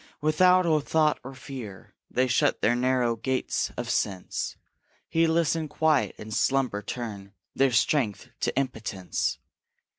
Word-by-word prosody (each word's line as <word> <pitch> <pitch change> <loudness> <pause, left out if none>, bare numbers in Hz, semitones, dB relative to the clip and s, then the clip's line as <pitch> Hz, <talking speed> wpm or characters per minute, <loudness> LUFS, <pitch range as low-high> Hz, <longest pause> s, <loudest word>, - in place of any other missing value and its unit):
Without 180 +4 +4
a 155 -2 +3
thought, 155 +1 +2
or 135 +1 -8
fear, 120 -8 -9 0.2
they 130 - +2
shut 125 -1 +2
The 120 - +3
narrow 125 -1 +1
gates 130 +3 -1
of - - -3
sense; 95 -3 -2 0.5
Heedless 165 -1 +2
and 160 -2 -3
quiet, 150 -12 +2
in 110 - -9
slumber 130 -2 +1
turn 100 -3 -6 0.2
Their 135 0 +3
strength 120 - +1
to - - -1
impotence. 110 -8 -2
130 Hz, 130 wpm, -27 LUFS, 110-155 Hz, 0.5 s, Without